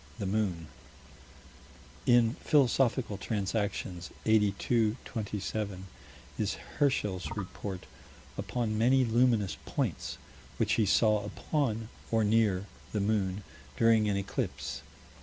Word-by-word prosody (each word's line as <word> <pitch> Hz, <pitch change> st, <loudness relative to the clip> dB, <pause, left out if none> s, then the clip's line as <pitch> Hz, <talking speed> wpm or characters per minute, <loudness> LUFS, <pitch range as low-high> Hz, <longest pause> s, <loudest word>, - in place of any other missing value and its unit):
the 100 Hz, -, -3 dB
moon: 95 Hz, -4 st, 0 dB, 1.4 s
In 120 Hz, -2 st, +5 dB
Philosophical 130 Hz, -, +2 dB
Transactions, 100 Hz, -4 st, -2 dB, 0.2 s
82 110 Hz, +1 st, +2 dB
27, 105 Hz, -3 st, -4 dB, 0.5 s
is -, -, 0 dB
Herschel's 105 Hz, -10 st, -1 dB
report 95 Hz, -1 st, -5 dB, 0.5 s
upon 110 Hz, -3 st, -2 dB
many 130 Hz, +3 st, +4 dB
luminous 115 Hz, -3 st, +2 dB
points, -, -, -2 dB, 0.4 s
which -, -, +2 dB
he 110 Hz, -3 st, +2 dB
saw 105 Hz, 0 st, +4 dB
upon 115 Hz, 0 st, -2 dB, 0.2 s
or 115 Hz, -1 st, +2 dB
near? 105 Hz, -3 st, +2 dB, 0.3 s
the 105 Hz, -, +1 dB
moon, 100 Hz, -1 st, 0 dB, 0.3 s
during 110 Hz, -2 st, +4 dB
an 100 Hz, -, +1 dB
eclipse. 100 Hz, 0 st, -3 dB
110 Hz, 100 wpm, -30 LUFS, 100-115 Hz, 1.4 s, In